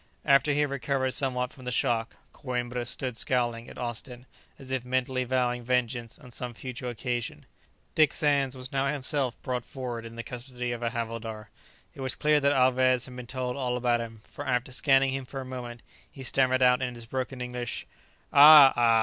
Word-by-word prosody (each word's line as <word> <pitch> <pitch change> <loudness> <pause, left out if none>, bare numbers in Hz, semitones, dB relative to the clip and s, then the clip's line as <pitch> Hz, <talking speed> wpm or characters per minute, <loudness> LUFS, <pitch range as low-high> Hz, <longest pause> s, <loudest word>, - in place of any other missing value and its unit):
After 140 0 +4
he 145 +1 +2
had 145 -2 0
recovered 130 0 -1
somewhat 125 -2 0
from 130 - -13
the 125 - -2
shock, 115 -1 0 0.2
Coïmbra 125 -3 -3
stood 125 -2 -3
scowling 120 -2 0
at - - -12
Austin, 120 +1 -6 0.3
as 130 -1 -8
if 130 -2 -1
mentally 130 0 -1
vowing 125 -1 0
vengeance 120 -1 -1
on 125 -5 -15
some 120 0 -6
future 125 +2 -6
occasion. 120 0 -4 0.5
Dick 155 -2 +4
Sands 140 -3 +1
was 130 0 -8
now 135 0 +1
himself 140 -3 0
brought 125 -3 -2
forward 125 -3 -6
in 115 0 -10
the 115 - -5
custody 125 0 -5
of 120 -1 -4
a 120 - 0
havildar. 115 -2 -5 0.4
It - - -10
was 130 -1 0
clear 150 0 +3
that 140 0 +3
Alvez 130 -2 +3
had 125 - -11
been 125 -1 -8
told 125 -1 -3
all 125 -2 -1
about 120 -1 +1
him, 115 -2 -8
for 145 - -9
after 125 0 0
scanning 135 0 +3
him 135 0 -3
for 135 +2 -7
a 130 - -6
moment, 120 -2 -7 0.3
he 135 - -10
stammered 130 0 +2
out 125 0 +5
in 125 -1 -3
his 120 -1 -6
broken 130 +2 -4
English, 125 -2 -4 0.5
"Ah! 145 -1 +10
ah! 115 -1 +4
125 Hz, 195 wpm, -28 LUFS, 120-135 Hz, 0.5 s, Ah